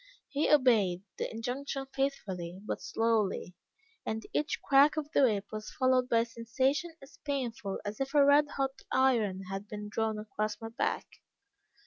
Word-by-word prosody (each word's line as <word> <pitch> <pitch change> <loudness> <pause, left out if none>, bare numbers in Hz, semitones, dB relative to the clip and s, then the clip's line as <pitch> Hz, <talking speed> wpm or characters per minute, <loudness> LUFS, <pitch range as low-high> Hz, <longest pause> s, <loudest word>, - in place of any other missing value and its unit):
He 285 +1 0
obeyed 220 -11 +4 0.2
the - - -1
injunction 265 +4 -4
faithfully, 190 -10 -2
but - - -3
slowly, 220 -5 0 0.5
and 220 0 -3
each 300 - 0
crack 285 +2 +5
of 300 -1 -3
the - - +3
whip 210 -6 +3
was 215 0 -5
followed 255 -1 +2
by 230 -1 +4
a - - -1
sensation 260 +8 -1
as 275 - -16
painful 245 -8 -3
as 205 +1 -5
if 270 +2 -3
a 285 -1 +7
red 290 +1 +6
hot 270 0 -1
iron 225 -8 +2
had 195 +1 -5
been 210 0 -6
drawn 220 0 -1
across 215 0 -3
my 225 - -6
back. 230 - -1
230 Hz, 160 wpm, -31 LUFS, 210-275 Hz, 0.5 s, a